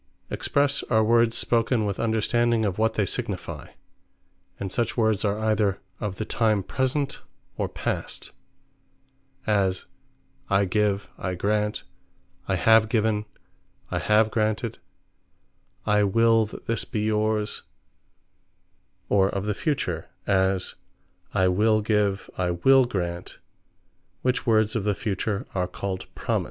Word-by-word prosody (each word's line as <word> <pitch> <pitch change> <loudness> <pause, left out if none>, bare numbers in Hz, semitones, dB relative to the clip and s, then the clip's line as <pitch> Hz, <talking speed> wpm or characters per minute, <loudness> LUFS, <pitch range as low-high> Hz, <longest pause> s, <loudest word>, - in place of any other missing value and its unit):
Expresse, 140 -1 +1
are 110 -2 +4
words 115 +1 +3
spoken 115 -1 +1
with 100 -2 -2
understanding 115 0 +1
of 100 0 -2
what 110 0 +2
they 105 - +2
signifie; - - -4 0.8
And 95 -2 -4
such 120 +2 -1
words 110 -3 +2
are 105 -1 +1
either 110 -2 +1 0.2
of 105 -3 -3
the 110 - -4
time 110 -3 +1
Present, 135 +5 -1 0.3
or - - -2
Past; - - -4 1.1
as, 95 -3 +1 0.6
I 100 0 +3
Give, 100 +1 0
I 95 -1 -2
Grant, 105 +3 0 0.6
I - - +1
Have 110 -1 +5
Given, 110 -1 +1 0.7
I - - 0
Have 110 +1 +3
Granted, 110 +1 -1 1.1
I 105 0 +3
Will 115 +2 +4
That - - -11
This 115 - 0
Be 105 - -3
Yours: 105 0 0 1.5
Or 95 -1 +3
of 100 0 -3
the 105 - 0
future; 150 - -2 0.2
as, 95 -1 +1 0.6
I 95 - +2
Will 110 +4 +3
Give, 105 -2 +1
I 90 -1 +1
Will 130 +10 +5
Grant; 85 -6 -4 0.9
which 125 +1 0
words 110 -2 +3
of 110 - 0
the 105 -1 +1
future, 100 -1 -2
are 90 -2 0
called 95 0 -5
Promise. - - 0
105 Hz, 130 wpm, -25 LUFS, 100-115 Hz, 1.5 s, Have